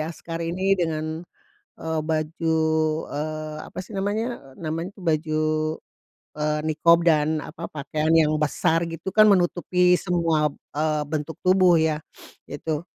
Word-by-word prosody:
askar 165 +1 -5
ini 180 +4 0
dengan, 160 -1 -2 0.6
eee, 160 -1 -2
baju, 160 +1 -1 0.5
eee, 155 +1 -4 0.2
apa - - -9
sih 195 +2 -9
namanya, 205 - -3
namanya 165 +3 -4
baju, 155 -2 0 1.0
eee, 150 0 0
niqab 170 +2 +4
dan, 155 -1 +3
apa, 160 +3 -8
pakaian 155 +1 -2
yang 155 -2 +4
besar 155 +2 +1
gitu 165 +3 -6
kan 215 -1 +8
menutupi 180 0 +3
semua, 165 -5 +1 0.2
eee, 155 0 0
bentuk 155 0 -4
tubuh 185 -2 +4
ya, 160 -1 +1 0.5
itu. 150 +1 -3
160 Hz, 125 wpm, -24 LUFS, 155-175 Hz, 1.0 s, kan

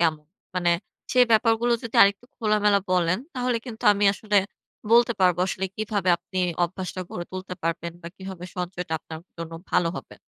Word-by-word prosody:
কেম 165 -2 +3 0.4
মানে 175 -1 +2 0.4
সে 255 - +4
ব্যাপারগুলো 225 +1 +3
যদি 230 - -7
আরেকটু 200 +3 +3
খোলামেলা 210 -2 +3
বলেন 180 0 +2 0.2
তাহলে 250 -1 0
কিন্তু 225 -3 -8
আমি 205 0 0
আসলে 210 +1 -1 0.6
বলতে 235 0 +6
পারবো 180 -2 +4
আসলে 190 0 -2
কিভাবে 205 -3 -1
আপনি 185 +2 -6 0.3
অভ্যাসটা 185 +1 -5
গড়ে 175 - -5
তুলতে 185 0 -5
পারবেন 165 0 -2
বা 170 - -6
কিভাবে 190 -2 -8
সঞ্চয়টা 180 -1 -4
আপনার 160 0 -9 0.2
জন্য 165 0 -6 0.2
ভালো 170 - +3
হবে। - - -9
190 Hz, 165 wpm, -25 LUFS, 175-215 Hz, 0.6 s, বলতে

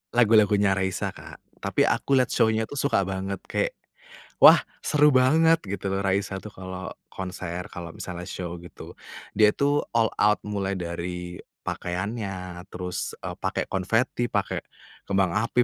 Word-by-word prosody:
Lagu-lagunya 105 -4 +5
Raisa, 95 -1 -1
Kak. - - -12 0.2
Tapi - - +1
aku 140 - +2
lihat 130 -2 +3
show-nya 110 0 +3
tuh 140 +5 -5
suka 135 -8 +2
banget, 95 0 -4
kayak - - -1 0.7
"Wah! - - +10 0.2
seru 150 0 +4
banget," 155 +6 +5
gitu 95 0 -3
loh, 95 - 0
Raisa 95 0 0
tuh 105 - -8
kalau 95 0 -7 0.2
konser, 90 -2 -5
kalau 85 -1 -7
misalnya 90 -1 -6
show 90 -1 -5
gitu. 85 - -11 0.4
Dia 105 0 +6
tuh 145 +1 +2
all 115 -1 +3
out, 105 +1 +4
mulai 100 -2 -2
dari 90 +1 -5 0.3
pakaiannya, 95 -1 -4
terus, 90 0 -4
eee, - - -4
pakai - - -1
konveti, 115 +5 +1
pakai - - 0 0.5
kembang 95 -2 +2
api, 125 +1 +2
95 Hz, 145 wpm, -26 LUFS, 90-115 Hz, 0.7 s, Wah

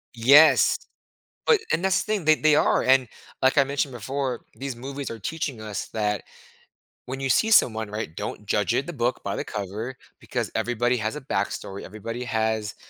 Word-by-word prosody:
Yes! 140 +7 +6 0.7
But 460 - +6
and 165 +4 0
that's 190 -1 +2
the 215 - -2
thing, 205 -5 -1
they 155 0 +6
they 155 -1 +4
are. - - +3
And, 130 -1 +4 0.3
like 130 +2 +4
I 140 - +6
mentioned 140 0 -2
before, 130 +1 -3
these 135 -2 -5
movies 135 +2 -6
are 115 - -6
teaching 140 +2 -4
us 105 -3 -5
that 105 -2 -1 0.8
when 130 +1 -5
you 135 0 -2
see 220 - +3
someone, 110 - +4
right, 105 -6 -5
don't 105 - -6
judge 105 +1 +1
it- 135 - 0
the 175 - -6
book 120 -2 -1
by 100 - -2
the - - -3
cover- 105 +5 -5 0.2
because - - -3
everybody 120 +1 0
has 110 +1 -2
a 150 - -6
backstory. 100 -4 -3
Everybody 115 +4 -6
has 110 -2 -1
120 Hz, 185 wpm, -25 LUFS, 110-140 Hz, 0.8 s, Yes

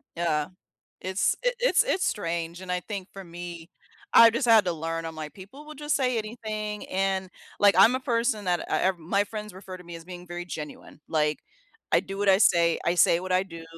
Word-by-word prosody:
Yeah. 160 -3 0 0.5
It's 190 +1 0
it - - +1
it's - - +4
it's 375 - 0
strange, 170 -4 -2
and 180 -1 -5
I 180 - 0
think, 200 -2 -6
for 195 - -9
me, 170 -1 -9 0.4
I 230 0 +9
just 235 +1 -1
had 220 -2 +7
to 180 - 0
learn, 165 +1 -4
I'm 160 - -6
like, 155 -1 -7
"People 205 +10 -13
will 305 0 -10
just 295 +1 -2
say 250 -4 +1
anything," 215 -1 -5
and, 190 0 -1 0.3
like, 205 -1 +5
I'm 225 +6 +7
a 260 - -1
person 235 -4 0
that, 175 -1 0
uh - - +2
uh - - -3
my 195 +5 +1
friends 210 -1 -7
refer 190 -1 -9
to 180 - -14
me 170 0 -9
as 165 -1 -9
being 180 -1 -10
very 175 0 -6
genuine, 155 -3 -8
like, 150 -1 +1 0.5
I - - +5
do 195 0 -7
what 205 -1 0
I 190 - +6
say, 170 -4 +4
I 170 +1 +1
say 170 -1 +4
what 185 0 -7
I 185 +1 +2
do. 165 -3 -10
185 Hz, 220 wpm, -26 LUFS, 170-215 Hz, 0.5 s, I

